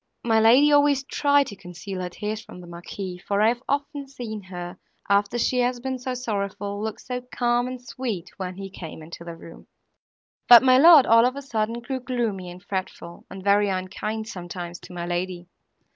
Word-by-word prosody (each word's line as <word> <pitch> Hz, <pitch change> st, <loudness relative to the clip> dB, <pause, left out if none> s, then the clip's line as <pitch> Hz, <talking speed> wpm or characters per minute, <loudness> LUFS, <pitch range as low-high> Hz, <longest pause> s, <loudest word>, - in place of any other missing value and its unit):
My 225 Hz, -1 st, +3 dB
lady 250 Hz, +7 st, +6 dB
always 285 Hz, -2 st, +4 dB
tried 285 Hz, 0 st, +2 dB
to 205 Hz, -, -8 dB
conceal 185 Hz, +1 st, -7 dB
her 180 Hz, -, -3 dB
tears 210 Hz, +4 st, -4 dB
from 180 Hz, -, -12 dB
the 180 Hz, -, -11 dB
Marquis, 180 Hz, +2 st, -7 dB
for 200 Hz, +2 st, -2 dB
I 215 Hz, +2 st, +5 dB
have 240 Hz, +1 st, -2 dB
often 285 Hz, 0 st, -2 dB
seen 235 Hz, -6 st, -7 dB
her, 180 Hz, -1 st, -8 dB, 0.3 s
after 200 Hz, +3 st, +2 dB
she 250 Hz, +1 st, +1 dB
has 245 Hz, 0 st, +1 dB
been 260 Hz, +1 st, -4 dB
so 255 Hz, +1 st, -4 dB
sorrowful, 205 Hz, -3 st, -3 dB
look 220 Hz, 0 st, -4 dB
so 250 Hz, 0 st, -5 dB
calm 240 Hz, 0 st, +1 dB
and 255 Hz, 0 st, -6 dB
sweet, 235 Hz, -8 st, -5 dB
when 185 Hz, -1 st, -5 dB
he 195 Hz, 0 st, -8 dB
came 160 Hz, -3 st, -9 dB
into 170 Hz, +2 st, -10 dB
the 170 Hz, -1 st, -8 dB
room! 165 Hz, 0 st, -13 dB, 0.8 s
But 240 Hz, 0 st, +10 dB
my 255 Hz, 0 st, +6 dB
lord, 315 Hz, -3 st, +9 dB
all 230 Hz, +1 st, +6 dB
of 255 Hz, -, -3 dB
a 280 Hz, -, -5 dB
sudden, 230 Hz, -2 st, -2 dB
grew 260 Hz, +2 st, -4 dB
gloomy 230 Hz, -8 st, -3 dB
and 180 Hz, +1 st, -11 dB
fretful, 185 Hz, -3 st, -6 dB
and 190 Hz, 0 st, -9 dB
very 205 Hz, +1 st, +3 dB
unkind 205 Hz, +4 st, -3 dB
sometimes 175 Hz, -3 st, -7 dB
to -, -, -13 dB
my 170 Hz, -1 st, -4 dB
lady. 175 Hz, 0 st, -3 dB
215 Hz, 195 wpm, -24 LUFS, 185-250 Hz, 0.8 s, But